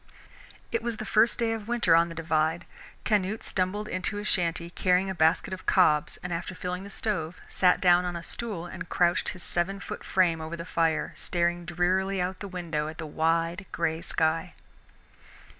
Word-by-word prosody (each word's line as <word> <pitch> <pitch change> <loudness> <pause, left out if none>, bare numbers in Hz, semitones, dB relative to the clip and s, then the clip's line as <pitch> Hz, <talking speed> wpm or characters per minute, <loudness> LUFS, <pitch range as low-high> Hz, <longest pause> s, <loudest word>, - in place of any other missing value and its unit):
It 460 - 0
was 235 -2 -3
the 215 - -5
first 220 +2 +3
day 230 -1 +1
of 220 -2 -6
winter 235 -8 +3
on 170 +1 +4
the 165 - -8
Divide. 160 +1 0 0.4
Canute 210 0 +1
stumbled 195 +3 -1
into 185 +2 -2
his 205 +1 -4
shanty 170 -2 0
carrying 185 +2 +2
a - - -2
basket 165 +3 +2
of 185 - -8
cobs, 155 -4 +3
and 180 -1 -3
after 170 +2 -4
filling 180 +1 -4
the 200 - -9
stove, 185 -5 -3
sat 180 -1 +4
down 180 -1 +5
on 180 -1 -3
a 170 - -5
stool 205 -3 -3
and 175 0 -7
crouched 175 -1 +2
his 185 - -7
seven 190 +3 -1
foot - - -7
frame 170 -4 +2
over 160 +2 -5
the 170 - -6
fire, 165 -3 0
staring 175 0 -1
drearily 185 +3 +1
out 180 +1 0
of - - -31
the 200 - -5
window 170 -5 -3
at 155 +1 -7
the 160 - -5
wide 165 +4 0
gray 165 -1 -1
sky. 165 +2 0
175 Hz, 190 wpm, -28 LUFS, 165-190 Hz, 0.4 s, down